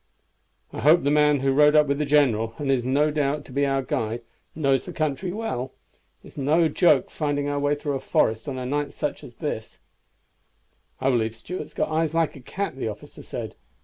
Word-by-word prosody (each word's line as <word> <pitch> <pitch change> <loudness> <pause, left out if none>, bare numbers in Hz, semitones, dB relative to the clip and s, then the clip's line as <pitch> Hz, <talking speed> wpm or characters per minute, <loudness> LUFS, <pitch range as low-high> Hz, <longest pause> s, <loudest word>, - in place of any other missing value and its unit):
"I - - -5
hope 155 +5 +5
the 140 - +2
man 150 -2 +4
who 135 0 +2
rode 150 +2 +5
up 150 0 +6
with 140 0 -1
the 150 - 0
general, 115 -7 +2
and 140 -2 -1
is 130 -3 +1
no 145 +4 +2
doubt 145 0 -1
to - - -13
be 140 +2 +1
our 135 0 0
guide, 115 -1 -2 0.3
knows 135 -4 +1
the 180 - -6
country 155 +3 -2
well. 135 - -4 0.5
It - - -13
is - - -11
no 155 +5 +3
joke 175 +3 +3
finding 145 -2 -1
our 145 0 -1
way 145 +1 +1
through 145 0 -3
a 135 - -1
forest 110 -1 0
on 135 - -4
such 130 - -4
a 145 +2 -2
night - - -18
as - - -17
this." - - -5 1.2
"I 135 +1 +2
believe 115 -2 0
Stuart's 155 +6 -7
got - - 0
eyes 160 0 0
like 165 -2 +1
a - - -10
cat," 190 +3 -4
the 130 - -3
officer 105 -1 -8
said. - - -6
145 Hz, 215 wpm, -24 LUFS, 130-150 Hz, 1.2 s, up